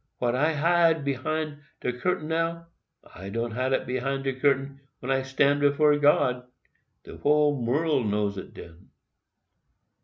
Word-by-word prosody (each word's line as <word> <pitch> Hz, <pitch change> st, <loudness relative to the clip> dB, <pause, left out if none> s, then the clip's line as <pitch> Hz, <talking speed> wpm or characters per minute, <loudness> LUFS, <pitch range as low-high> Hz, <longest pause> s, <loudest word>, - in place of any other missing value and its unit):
What 120 Hz, -1 st, 0 dB
I 150 Hz, +5 st, +1 dB
hide 165 Hz, 0 st, +2 dB
behind 150 Hz, +3 st, -2 dB, 0.2 s
de 125 Hz, -, -1 dB
curtain 155 Hz, +5 st, -2 dB
now, 165 Hz, +1 st, -2 dB, 0.5 s
I 95 Hz, +2 st, -9 dB
can't 115 Hz, +2 st, -3 dB
hide 130 Hz, +3 st, -1 dB
it -, -, 0 dB
behind 135 Hz, +2 st, -2 dB
de 135 Hz, -1 st, -1 dB
curtain 135 Hz, +1 st, 0 dB, 0.2 s
when 130 Hz, -, -4 dB
I 135 Hz, 0 st, +2 dB
stand 140 Hz, +2 st, +1 dB
before 145 Hz, +1 st, +3 dB
God—de 125 Hz, -4 st, -2 dB
whole 145 Hz, -3 st, +2 dB
world 140 Hz, 0 st, +1 dB
know 105 Hz, 0 st, 0 dB
it 100 Hz, -1 st, -8 dB
den. 85 Hz, +1 st, -13 dB
135 Hz, 145 wpm, -26 LUFS, 125-150 Hz, 0.5 s, before